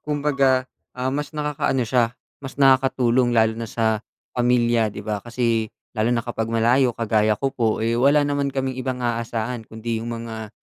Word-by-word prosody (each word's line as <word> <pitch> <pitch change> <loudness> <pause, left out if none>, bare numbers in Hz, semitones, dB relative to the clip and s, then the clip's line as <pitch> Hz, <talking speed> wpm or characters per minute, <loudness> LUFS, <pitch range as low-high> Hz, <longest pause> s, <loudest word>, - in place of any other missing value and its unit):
kumbaga, 140 -3 +1 0.3
ah, 130 +1 -1
mas 150 +2 -4
nakakaano 145 -3 0
siya, 120 +1 +1 0.2
mas 135 -1 -8
nakakatulong, 130 -2 +3
lalo 110 0 +4
na 115 - -4
sa 110 -2 0 0.3
pamilya, 120 -2 +2
'di 105 0 -8
ba? 105 -1 -2
Kasi, 115 -1 -1 0.2
lalo 110 -1 0
na 120 -1 0
kapag 115 -2 -3
malayo, 120 +2 +2
kagaya 110 -1 +2
ko 135 -1 -2
po, 110 -2 0
eh, 115 - +1
wala 140 +5 +4
naman 145 -1 0
kaming 130 -1 -3
ibang 125 -1 -3
aasahan 115 0 -3
kundi 110 0 -4
yung 115 +1 -4
mga 110 -2 -6
120 Hz, 170 wpm, -22 LUFS, 115-130 Hz, 0.3 s, lalo